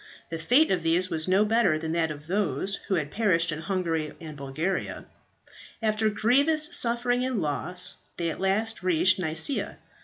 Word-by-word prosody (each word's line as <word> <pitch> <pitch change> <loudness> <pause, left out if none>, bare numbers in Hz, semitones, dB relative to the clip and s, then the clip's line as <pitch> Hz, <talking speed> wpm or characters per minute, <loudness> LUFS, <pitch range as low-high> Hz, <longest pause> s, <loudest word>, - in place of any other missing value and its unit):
The 165 - -4
fate 255 - +4
of 180 -3 +1
these 170 +3 +1
was 160 0 0
no 190 +3 +4
better 210 -7 +3
than 160 0 -4
that 165 -1 +1
of 150 -1 -8
those 195 0 -1
who 195 - +1
had 150 -4 -2
perished 180 -6 +2
in 155 - -4
Hungary 165 -4 -2
and 155 -2 -9
Bulgaria. 150 +7 -3 0.7
After 215 0 +1
grievous 285 +10 +2
suffering 245 +1 +1
and 255 -4 -1
loss 175 +3 -1 0.2
they 170 -1 -1
at - - -8
last 215 +4 0
reached 185 +1 +3
Nicaea. 170 - -1
185 Hz, 165 wpm, -27 LUFS, 160-220 Hz, 0.7 s, fate